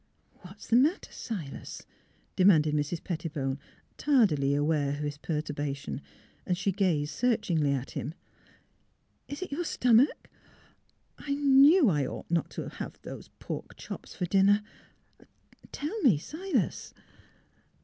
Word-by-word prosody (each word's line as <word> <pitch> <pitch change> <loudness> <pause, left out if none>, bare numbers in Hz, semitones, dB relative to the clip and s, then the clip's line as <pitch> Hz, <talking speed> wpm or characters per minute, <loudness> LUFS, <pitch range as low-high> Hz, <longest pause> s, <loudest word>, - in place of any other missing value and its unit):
" - - -39
What 185 +3 -12
is - - -12
the 235 - +4
matter, 300 +9 +2
Silas? 180 - -7 0.3
" - - -38
demanded 160 -6 +5
Mrs, 150 +3 -1
Pettibone, 150 -6 -3 0.4
tardily 165 - +3
aware 145 -1 +1
of 145 +1 -4
his 145 0 -4
perturba 150 -3 -3
tion. 140 0 -6 0.5
She 180 +2 0
gazed 170 -7 0
searchingly 180 - +1
at 135 -1 -3
him. 150 +5 -5 1.1
"Is 290 +5 -5
it 370 - -8
your 320 +5 -2
stomach? 250 -4 +3 0.9
I 280 -1 -2
knew 285 +3 +6
I 145 -8 +2
ought - - -8
not 170 -2 +1
to - - -3
have - - -7
those - - -8
pork - - -7
chops - - -8
for 180 - -2
dinner.... 200 +3 +4 1.1
Tell 350 +10 -4
me, 235 - +5
Silas? 345 - -3
180 Hz, 135 wpm, -29 LUFS, -, 1.1 s, knew